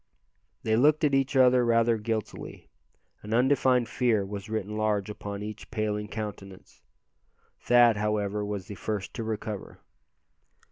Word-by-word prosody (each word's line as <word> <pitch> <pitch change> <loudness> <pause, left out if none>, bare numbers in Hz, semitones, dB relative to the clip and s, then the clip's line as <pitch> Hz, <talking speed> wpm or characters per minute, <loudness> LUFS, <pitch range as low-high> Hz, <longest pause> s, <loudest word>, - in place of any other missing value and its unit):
They 110 - +2
looked 150 +6 +4
at 145 -2 +3
each 135 0 +1
other 125 -1 +5
rather 115 -1 +3
guiltily. 110 0 -5 0.5
An 105 +2 -3
undefined 125 -1 +3
fear 110 -3 +1
was 100 +2 -7
written 105 -1 -3
large 105 -1 0
upon 100 -1 -6
each 105 0 -8
paling 105 -2 -2
countenance. 100 -3 -8 0.8
Thad, 120 -2 +5
however, 105 -1 -1
was 100 -2 -4
the 105 - -8
first 100 0 -4
to 115 - -4
recover. 110 -2 -5
110 Hz, 135 wpm, -27 LUFS, 105-120 Hz, 0.8 s, other